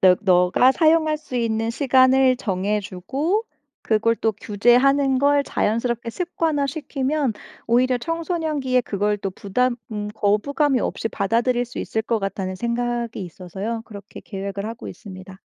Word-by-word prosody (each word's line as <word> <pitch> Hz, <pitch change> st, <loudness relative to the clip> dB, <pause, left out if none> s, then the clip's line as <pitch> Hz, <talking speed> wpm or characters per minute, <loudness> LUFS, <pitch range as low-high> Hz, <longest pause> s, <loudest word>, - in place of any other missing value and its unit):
너 185 Hz, -1 st, +6 dB
너가 185 Hz, +7 st, +4 dB
사용할 315 Hz, -1 st, +3 dB
수 300 Hz, -5 st, -7 dB
있는 225 Hz, -1 st, 0 dB
시간을 260 Hz, 0 st, +4 dB
정해주고 210 Hz, -, -2 dB, 0.4 s
그걸 225 Hz, +1 st, +2 dB
또 220 Hz, -1 st, 0 dB
규제하는 255 Hz, +7 st, +3 dB
걸 285 Hz, +1 st, +3 dB
자연스럽게 235 Hz, +1 st, -1 dB
습관화시키면 295 Hz, -, -1 dB, 0.3 s
오히려 250 Hz, +2 st, +3 dB
청소년기에 320 Hz, -5 st, -1 dB
그걸 210 Hz, -2 st, -1 dB
또 195 Hz, -1 st, -3 dB
부담 240 Hz, +6 st, -1 dB, 0.2 s
음 210 Hz, -1 st, -3 dB
거부감이 255 Hz, +7 st, +1 dB
없이 -, -, -2 dB
받아들일 235 Hz, +5 st, 0 dB
수 245 Hz, -, -9 dB
있을 220 Hz, -, -2 dB
것 230 Hz, 0 st, 0 dB
같다는 195 Hz, -2 st, -3 dB
생각이 235 Hz, 0 st, -2 dB
있어서요 190 Hz, +6 st, -5 dB
그렇게 200 Hz, -1 st, -11 dB
계획을 200 Hz, 0 st, -5 dB
하고 230 Hz, +2 st, -7 dB
있습니다. 190 Hz, -2 st, -11 dB
235 Hz, 330 characters per minute, -22 LUFS, 205-270 Hz, 0.4 s, 너